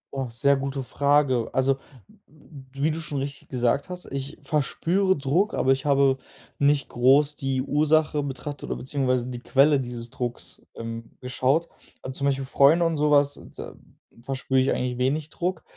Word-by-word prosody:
Oh, 135 -1 -2
sehr 140 +4 +2
gute 135 0 -3
Frage. 140 -3 +2
Also, 130 +1 +2 0.5
w 140 -2 -11
wie 155 - +3
du 160 - -4
schon 150 -3 -5
richtig 140 0 -5
gesagt 125 +4 0
hast, 180 0 -7
ich 140 +2 -5
verspüre 170 +7 +1
Druck, 165 - +1
aber 135 - +2
ich 135 +1 0
habe 140 -2 +3 0.4
nicht 145 -1 +3
groß 140 +4 +4
die 135 -2 -1
Ursache 150 +1 +2
betrachtet 145 +1 -6
oder - - -1
beziehungsweise 130 -2 -1
die 125 -1 -6
Quelle 140 +3 +4
dieses 120 -2 -6
Drucks, 120 -1 -5
ähm, 115 0 -6
geschaut. 130 +6 0 0.4
Also, 130 0 -5
zum 140 - -1
Beispiel 135 -1 0
Freunde 145 +6 +4
und 165 -1 0
sowas, 145 -1 +3
da - - -7 0.5
verspüre 130 +1 -1
ich 130 - +2
eigentlich 125 -1 -2
wenig 145 +4 0
Druck, 180 -2 -3
140 Hz, 165 wpm, -25 LUFS, 130-150 Hz, 0.5 s, groß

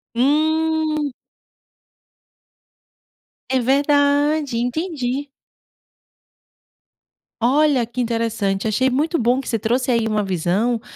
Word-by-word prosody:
Hum. 310 +2 +1 2.4
É 260 - +2
verdade, 285 +1 +2
entendi. 275 +1 -2 2.1
Olha 270 0 +3
que 245 +2 -4
interessante, 225 -4 -1
achei 240 +5 +1
muito 305 +6 0
bom 245 +2 +2
que 270 - -7
você 225 - -1
trouxe 250 +5 0
aí 230 -2 +1
uma 215 -1 0
visão, 195 +6 0
255 Hz, 90 wpm, -20 LUFS, 230-295 Hz, 2.4 s, Olha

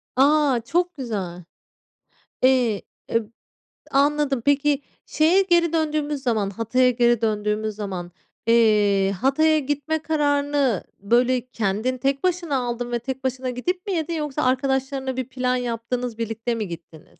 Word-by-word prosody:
A, 280 -2 +4
çok 350 +5 0
güzel. 195 -9 -4 1.0
Eee, 250 -5 +3 0.3
eb 230 -1 +1 0.7
anladım. 280 -1 +2
Peki, 285 0 +2 0.2
şeye 330 +5 +3
geri 345 -3 +2
döndüğümüz 300 -3 -1
zaman, 220 -6 0
Hatay'a 230 +5 +2
geri 240 -2 +2
döndüğümüz 210 0 -1
zaman, 190 -4 -5 0.4
eee, 210 -4 +4
Hatay'a 310 +4 +3
gitme 290 +3 -2
kararını 285 - +1 0.2
böyle 245 +4 +2
kendin 225 +2 -1
tek 275 +1 -1
başına 350 -5 0
aldın 245 -1 -3
ve 240 - 0
tek 265 +2 -5
başına 260 0 -2
gidip 355 - -3
mi 395 - -1
yedin 335 -1 -2
yoksa 300 -4 -2
arkadaşlarınla 265 0 0
bir 260 -1 -3
plan 255 -1 0
yaptınız, 245 -1 -3
birlikte 230 +1 -2
mi 215 -3 -3
gittiniz? 165 -2 -11
255 Hz, 135 wpm, -23 LUFS, 230-290 Hz, 1.0 s, A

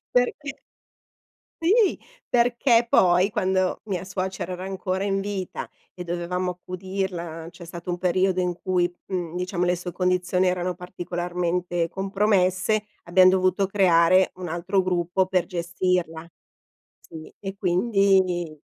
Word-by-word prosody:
perché 270 +3 0 1.1
sì, 400 +4 +3 0.3
perché 240 0 +3
poi 180 -1 +4
quando 190 -3 0
mia 195 -5 -3
suocera 190 -1 -4
era 180 +1 -6
ancora 190 0 -3
in 195 -1 0
vita 195 -2 -4 0.2
e 180 - -8
dovevamo 175 +1 -2
accudirla, 180 -2 -5
c'è 175 0 -12
stato 170 +1 -7
un 175 - -2
periodo 185 +1 +1
in 180 -1 0
cui, 180 -2 +1 0.2
mhmm, 175 -3 -3
diciamo 180 0 -1
le 180 0 +2
sue 175 0 -6
condizioni 180 +1 +1
erano 180 0 -1
particolarmente 175 -1 -2
compromesse, 195 +1 +1 0.2
abbiam 185 +2 +5
dovuto 185 +1 +2
creare 185 -2 +4
un 180 -1 -6
altro 175 +4 0
gruppo 180 +1 0
per 185 -2 +1
gestirla. 175 -1 -2 0.7
Sì, 160 -1 -11
e 195 0 -6
quindi 185 -4 +1
185 Hz, 125 wpm, -24 LUFS, 175-195 Hz, 1.1 s, abbiam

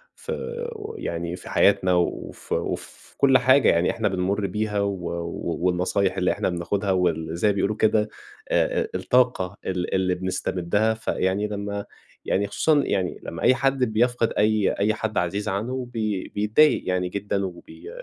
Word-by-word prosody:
فو 470 -2 -6
يعني 85 +1 -3
في 90 - -11
حياتنا 90 0 +3
وفي 90 -1 -2
وفي - - -6
كل 135 -1 +5
حاجة 130 +2 +5
يعني 85 +1 +3
إحنا 110 -2 -1
بنمُر 95 +2 0
بيها، 105 0 -2
و 100 0 +1 0.2
و 85 0 -4
والنصايح 90 +2 +1
اللي 90 -1 +2
إحنا - - -1
بناخدها 95 +3 -1
واللي 85 -3 0
زي 95 +5 +1
ما 100 - +3
بيقولوا 100 +2 0
كده 110 0 +2 0.4
آآ، - - +2
آآ، - - -3
الطاقة 120 -7 +1
ال 90 -1 -2
اللي 95 -1 +1
بنستمدها، 95 +3 0
فيعني 105 -2 -1
لمّا 100 0 -4 0.4
يعني 100 +1 +1
خصوصًا 150 +7 +2
يعني 95 -2 -1
لمّا 85 - -6
أي 130 - +5
حد 135 0 +1
بيفقد 120 0 +1
أي 105 -1 +3
أي 105 +2 +2
حد 110 0 -3
عزيز 100 +4 -1
عنُّه 125 +6 -3
بي 105 -4 -2
بيتضايق 110 +9 +3
يعني 90 -1 0
جدًا 100 0 -2
وبي 90 - -10
100 Hz, 160 wpm, -24 LUFS, 90-110 Hz, 0.4 s, كل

